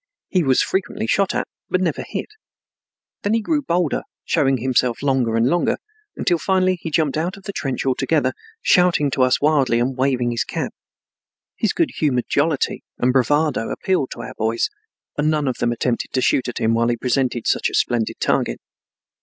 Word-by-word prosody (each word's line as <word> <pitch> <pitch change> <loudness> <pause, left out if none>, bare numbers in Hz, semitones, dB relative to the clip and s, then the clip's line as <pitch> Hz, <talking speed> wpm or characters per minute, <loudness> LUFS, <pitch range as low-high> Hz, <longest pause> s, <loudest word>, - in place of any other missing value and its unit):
He 185 - +2
was 135 -5 +3
frequently 200 +3 -2
shot 195 -4 +1
at, - - -1 0.2
but 185 - +1
never 175 -4 -1
hit. - - -5 0.9
Then 205 +2 +1
he - - +2
grew 295 +7 0
bolder, 175 - 0 0.2
showing 135 -2 +2
himself 125 0 0
longer 130 -5 +1
and 115 +1 +3
longer, 175 +7 +2 0.4
until 175 -2 +1
finally 185 -1 +1
he 165 - -4
jumped 155 -2 +1
out 175 +5 -2
of 195 - -14
the 200 - -5
trench 135 -6 -3
altogether, 140 +4 +1 0.3
shouting 175 -6 +4
to 130 - 0
us 130 0 +4
wildly 140 -5 +3
and 125 +2 0
waving 130 -2 +1
his 115 - 0
cap. - - -4 0.8
His - - +1
good - - 0
humored 130 -5 +1
jollity 145 0 0 0.2
and 125 +1 +2
bravado 145 -1 +2
appealed 185 -9 0
to - - -8
our 130 - -7
boys 115 +1 0 0.5
and 150 +1 +2
none 150 -2 +1
of 130 - -1
them 120 - +1
attempted 120 0 -2
to 130 - +1
shoot 130 - +2
at 120 - -4
him 110 0 +1
while 115 +1 +2
he 120 0 0
presented 125 -1 0
such - - +1
a - - -4
splendid 120 -2 0
target. - - 0
135 Hz, 185 wpm, -21 LUFS, 125-170 Hz, 0.9 s, shouting